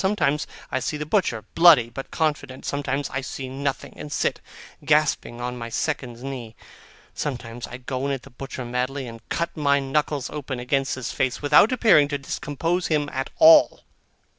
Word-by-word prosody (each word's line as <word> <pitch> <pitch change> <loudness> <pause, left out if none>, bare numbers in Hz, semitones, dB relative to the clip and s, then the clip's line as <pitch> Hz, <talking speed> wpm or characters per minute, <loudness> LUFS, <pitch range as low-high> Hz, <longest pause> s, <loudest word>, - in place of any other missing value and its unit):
Sometimes 190 -7 +1 0.2
I - - 0
see 150 - -3
the 150 - -4
butcher, 150 - 0
bloody 160 -9 +6
but 135 +3 -7
confident; 145 -4 -2
sometimes 140 0 -2
I 135 - -2
see 130 0 -6
nothing, 135 +1 -4
and 150 - -8
sit - - -1 0.4
gasping 150 -5 +1
on 125 0 -4
my 115 0 -5
second's 125 -2 -3
knee; 125 -5 -6 0.6
sometimes 120 -4 -5
I 120 - -8
go 130 +1 -3
in - - -1
at 135 -2 -3
the - - -14
butcher 130 0 -7
madly, 125 +3 -2
and 115 -1 -9
cut 170 +1 -2
my 140 -2 +2
knuckles 140 0 -1
open 140 -4 -5
against 135 +2 0
his 130 -3 -4
face, 130 +2 -1
without 150 - +6
appearing 220 - +5
to 145 0 -2
discompose 165 +6 -2
him 150 -2 0
at 135 +1 -2
all. 320 -1 +7
140 Hz, 175 wpm, -24 LUFS, 125-150 Hz, 0.6 s, all